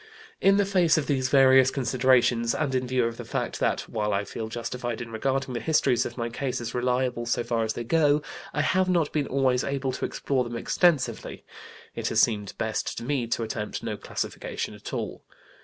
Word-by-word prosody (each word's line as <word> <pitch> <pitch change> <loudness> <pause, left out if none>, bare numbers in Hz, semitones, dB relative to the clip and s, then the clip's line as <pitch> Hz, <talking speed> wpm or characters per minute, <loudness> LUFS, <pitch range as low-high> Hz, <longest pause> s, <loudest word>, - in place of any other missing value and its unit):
In 195 +1 +5
the 205 - +3
face 180 -5 +3
of 155 - 0
these 130 -3 0
various 130 -1 +6
considerations, 125 -2 +2
and 145 -4 -1
in 130 -1 0
view 125 -1 +1
of 115 0 -3
the - - -6
fact - - -3
that, - - +1
while 105 -2 -2
I 100 +1 0
feel 110 +2 -5
justified 120 +1 -4
in 115 -1 -7
regarding 130 +3 -1
the 120 - -2
histories 135 -6 +2
of 120 - -11
my 115 -1 -1
cases 120 -1 -3
as - - -9
reliable 125 -1 0
so 120 0 0
far 115 -1 0
as 110 0 -1
they 120 - -4
go, 150 +3 +3 0.3
I - - 0
have 185 0 +2
not 170 -4 +2
been 145 -2 0
always 130 -2 +1
able 135 -1 -1
to - - -3
explore 135 -2 -1
them 120 -1 -5
extensively, 155 +1 +1 0.5
it - - -3
has - - +1
seemed 105 -3 +1
best 110 -1 -2
to - - -4
me 130 -2 -1
to 115 0 -1
attempt 110 -1 -4
no - - -3
classification - - -4
at - - -9
all. - - -4
125 Hz, 205 wpm, -26 LUFS, 115-140 Hz, 0.5 s, various